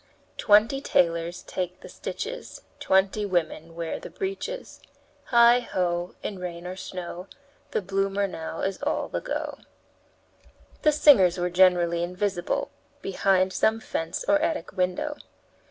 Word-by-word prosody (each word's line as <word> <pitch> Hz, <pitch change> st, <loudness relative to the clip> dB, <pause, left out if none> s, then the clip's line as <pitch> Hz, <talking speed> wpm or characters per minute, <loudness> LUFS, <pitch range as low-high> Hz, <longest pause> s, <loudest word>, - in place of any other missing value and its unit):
Twenty 215 Hz, +6 st, +4 dB
tailors 170 Hz, -4 st, +1 dB
take 180 Hz, 0 st, -4 dB
the -, -, -10 dB
stitches, 475 Hz, +3 st, -6 dB, 0.2 s
Twenty 190 Hz, +2 st, +2 dB
women 165 Hz, -4 st, -2 dB
wear 165 Hz, -1 st, -3 dB
the -, -, -9 dB
breeches. 395 Hz, +6 st, -5 dB, 0.5 s
Heigh! 235 Hz, 0 st, +6 dB
ho! 175 Hz, -6 st, -2 dB
in 200 Hz, -3 st, -4 dB
rain 175 Hz, -1 st, -6 dB
or 180 Hz, +1 st, -5 dB
snow, 180 Hz, -1 st, -7 dB, 0.4 s
The -, -, -1 dB
bloomer 195 Hz, +1 st, 0 dB
now 165 Hz, -3 st, -6 dB
is 195 Hz, -1 st, -2 dB
all -, -, -1 dB
the -, -, -3 dB
go." -, -, -4 dB, 1.2 s
The 305 Hz, -, +5 dB
singers 255 Hz, -, +6 dB
were 180 Hz, 0 st, -1 dB
generally 175 Hz, -2 st, +4 dB
invisible 180 Hz, +1 st, -2 dB, 0.3 s
behind 190 Hz, -1 st, +2 dB
some 220 Hz, +1 st, +2 dB
fence 165 Hz, -5 st, -4 dB
or 300 Hz, 0 st, +4 dB
attic 320 Hz, 0 st, -1 dB
window. 185 Hz, +12 st, -1 dB
185 Hz, 130 wpm, -26 LUFS, 175-220 Hz, 1.2 s, Heigh